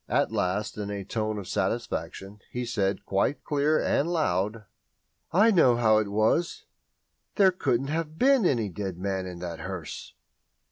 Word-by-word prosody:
At -, -, +1 dB
last, 105 Hz, +4 st, -1 dB
in 100 Hz, -1 st, -4 dB
a 100 Hz, -1 st, -4 dB
tone 110 Hz, +1 st, -2 dB
of 100 Hz, -3 st, -6 dB
satisfaction, 100 Hz, +2 st, -3 dB
he 125 Hz, 0 st, -4 dB
said, 100 Hz, -4 st, -1 dB
quite 100 Hz, +9 st, 0 dB
clear 150 Hz, +1 st, +1 dB
and 150 Hz, +4 st, +1 dB
loud: 105 Hz, -, 0 dB, 0.7 s
"I 210 Hz, +7 st, +5 dB
know 145 Hz, -, +5 dB
how 110 Hz, -2 st, +4 dB
it 110 Hz, -, -1 dB
was 110 Hz, -, 0 dB, 0.7 s
_There 190 Hz, -3 st, +4 dB
couldn't 135 Hz, -4 st, 0 dB
have 155 Hz, 0 st, -3 dB
been 265 Hz, +1 st, +4 dB
any 115 Hz, -8 st, 0 dB
dead 95 Hz, 0 st, -5 dB
man 95 Hz, 0 st, -2 dB
in 90 Hz, -1 st, -7 dB
that 85 Hz, -2 st, -5 dB
hearse! 95 Hz, -4 st, -7 dB
110 Hz, 155 wpm, -27 LUFS, 95-150 Hz, 0.7 s, I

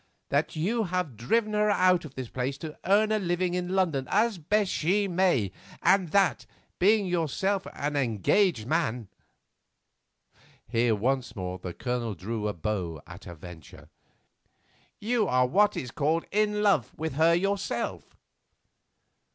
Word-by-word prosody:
That 145 Hz, +4 st, 0 dB
you 215 Hz, +8 st, 0 dB
have 180 Hz, -7 st, -2 dB
driven 215 Hz, -, 0 dB
her 210 Hz, 0 st, +2 dB
out 185 Hz, -4 st, +3 dB
of 140 Hz, -, -11 dB
this 130 Hz, -2 st, -5 dB
place 130 Hz, +3 st, -3 dB
to 155 Hz, +1 st, -7 dB
earn 210 Hz, +3 st, +4 dB
a 215 Hz, -, +2 dB
living 175 Hz, -1 st, -1 dB
in 180 Hz, +1 st, -2 dB
London 160 Hz, -9 st, +1 dB
as 215 Hz, -1 st, +2 dB
best 200 Hz, +5 st, +1 dB
she 200 Hz, +6 st, +1 dB
may, 175 Hz, -, +1 dB, 0.3 s
and 185 Hz, -1 st, +3 dB
that, 195 Hz, +3 st, +2 dB, 0.3 s
being 205 Hz, +2 st, +4 dB
yourself 180 Hz, +3 st, -1 dB
an 145 Hz, +1 st, -3 dB
engaged 130 Hz, -, +1 dB
man"—here 120 Hz, -, -5 dB
once 125 Hz, +4 st, -1 dB
more 90 Hz, -2 st, -5 dB
the 90 Hz, -1 st, -7 dB
Colonel 120 Hz, -4 st, -3 dB
drew 105 Hz, +4 st, -4 dB
a 105 Hz, -, -2 dB
bow 85 Hz, -2 st, -3 dB
at -, -, -12 dB
a 85 Hz, -, -8 dB
venture—"you 95 Hz, -, -7 dB
are 125 Hz, -2 st, +3 dB
what 205 Hz, +10 st, +3 dB
is 125 Hz, -, -4 dB
called 155 Hz, +5 st, 0 dB
in 210 Hz, 0 st, +1 dB
love 195 Hz, -, +2 dB
with 160 Hz, -2 st, -3 dB
her 165 Hz, +4 st, +4 dB
yourself." 195 Hz, +2 st, -2 dB
165 Hz, 140 wpm, -27 LUFS, 120-195 Hz, 0.3 s, earn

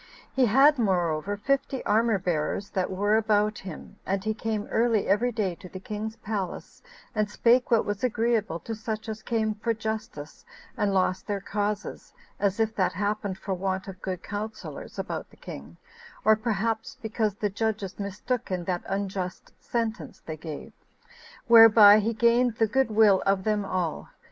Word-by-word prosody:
He 260 Hz, -2 st, +3 dB
had 270 Hz, +5 st, +5 dB
moreover 185 Hz, -2 st, 0 dB
fifty 275 Hz, +3 st, -1 dB
armor 225 Hz, 0 st, +3 dB
bearers 180 Hz, +2 st, -2 dB
that 185 Hz, -1 st, -1 dB
were 205 Hz, +3 st, +2 dB
about 210 Hz, -1 st, +1 dB
him; 185 Hz, -5 st, -9 dB
and 195 Hz, 0 st, -2 dB
he 215 Hz, +1 st, 0 dB
came 215 Hz, -1 st, -3 dB
early 230 Hz, -2 st, +2 dB
every 225 Hz, +5 st, +2 dB
day 210 Hz, -6 st, -1 dB
to 180 Hz, +2 st, -12 dB
the 185 Hz, -, -8 dB
king's 215 Hz, +3 st, -5 dB
palace, 200 Hz, -5 st, -5 dB, 0.3 s
and 215 Hz, -1 st, 0 dB
spake 240 Hz, +4 st, +3 dB
what 230 Hz, -2 st, +3 dB
was 205 Hz, +2 st, -3 dB
agreeable 225 Hz, -6 st, +1 dB
to 225 Hz, -, -5 dB
such 220 Hz, 0 st, -5 dB
as 220 Hz, 0 st, -5 dB
came 220 Hz, -2 st, 0 dB
for 225 Hz, +2 st, -2 dB
justice 220 Hz, -9 st, -6 dB, 0.3 s
and 205 Hz, -4 st, 0 dB
lost 185 Hz, -1 st, 0 dB
their 205 Hz, -2 st, -1 dB
causes, 205 Hz, -, -4 dB, 0.2 s
as 200 Hz, +1 st, 0 dB
if 220 Hz, 0 st, +1 dB
that 185 Hz, -2 st, +1 dB
happened 205 Hz, 0 st, -2 dB
for 195 Hz, 0 st, -4 dB
want 190 Hz, +1 st, -2 dB
of 190 Hz, -1 st, -9 dB
good 185 Hz, -1 st, -4 dB
counselors 205 Hz, -7 st, -6 dB
about -, -, -4 dB
the -, -, -20 dB
king, 70 Hz, +5 st, -10 dB, 0.5 s
or 220 Hz, 0 st, +7 dB
perhaps 220 Hz, 0 st, -2 dB
because 220 Hz, -2 st, -1 dB
the 205 Hz, -1 st, -2 dB
judges 210 Hz, -2 st, -2 dB
mistook 210 Hz, +5 st, -3 dB
in 180 Hz, -2 st, -2 dB
that 175 Hz, 0 st, -2 dB
unjust 195 Hz, -2 st, -4 dB
sentence 230 Hz, -1 st, -3 dB
they 160 Hz, -, -5 dB
gave; 155 Hz, -1 st, -8 dB, 0.7 s
whereby 225 Hz, -3 st, +9 dB
he 220 Hz, +2 st, 0 dB
gained 235 Hz, +1 st, +3 dB
the 225 Hz, -, +3 dB
good 265 Hz, +3 st, +1 dB
will 210 Hz, -3 st, +5 dB
of 195 Hz, -1 st, +2 dB
them 210 Hz, -1 st, +1 dB
all. 185 Hz, -4 st, -3 dB
210 Hz, 170 wpm, -27 LUFS, 190-225 Hz, 0.7 s, whereby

